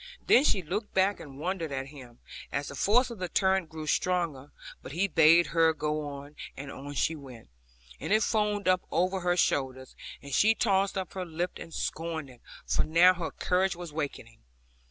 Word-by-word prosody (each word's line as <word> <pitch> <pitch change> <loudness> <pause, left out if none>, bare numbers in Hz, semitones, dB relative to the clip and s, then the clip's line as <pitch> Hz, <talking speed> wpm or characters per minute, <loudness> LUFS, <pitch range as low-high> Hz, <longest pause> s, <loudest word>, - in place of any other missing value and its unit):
Then 255 - +6
she 195 -10 +2
looked 205 +7 -4
back, 190 +2 +2
and 135 -3 -11
wondered 170 0 -3
at 135 0 -4
him, 130 -5 -13 0.3
as 140 0 -2
the 140 - -8
force 240 - +3
of 230 - -8
the 180 -1 -3
torrent 190 -2 +1
grew 155 0 -7
stronger, 160 -5 -1 0.3
but - - -9
he 190 +4 +1
bade 165 -1 +6
her 165 -1 +4
go 150 0 -2
on; 140 +1 -9 0.2
and 140 0 -7
on 145 +1 -8
she 160 +4 +1
went, 130 - -12 0.5
and - - -5
it 215 +1 +4
foamed 210 -2 0
up 185 -1 +4
over 185 +2 +1
her 175 0 0
shoulders; 130 -5 0 0.2
and 140 -1 -9
she 220 +8 +4
tossed 195 -1 +1
up 190 -1 -4
her 185 - -3
lip 175 +1 -3
and 165 - -9
scorned 160 -4 -4
it, 120 - -18 0.2
for 65 +4 +1
now 170 +3 +5
her 170 -3 -4
courage 185 0 0
was 175 -3 -8
waking. 145 - -5
165 Hz, 195 wpm, -29 LUFS, 145-190 Hz, 0.5 s, Then